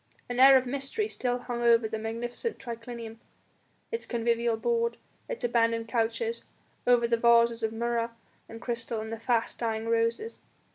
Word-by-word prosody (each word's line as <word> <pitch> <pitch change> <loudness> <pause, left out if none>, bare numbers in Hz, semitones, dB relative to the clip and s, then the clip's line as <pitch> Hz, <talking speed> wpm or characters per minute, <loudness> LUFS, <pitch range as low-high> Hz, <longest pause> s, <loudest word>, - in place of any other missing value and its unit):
An 245 0 -3
air 270 +1 +9
of 260 - 0
mystery 275 - -2
still 245 - -1
hung 245 -1 -5
over 235 -1 +4
the 220 0 -4
magnificent 240 - -4
triclinium, 230 -1 -7 0.7
its 460 +1 -4
convivial 235 -1 +1
board, 470 - 0 0.3
its - - -5
abandoned 230 -1 +1
couches, 240 - -1 0.4
over 240 -1 +5
the 235 0 +2
vases 235 0 +4
of 220 - 0
murra 235 +1 -1 0.4
and 225 - -9
crystal 235 -1 -3
and 220 +1 -5
the 225 - -5
fast 230 -1 0
dying 225 -1 -2
roses. 230 - 0
235 Hz, 155 wpm, -28 LUFS, 230-245 Hz, 0.7 s, air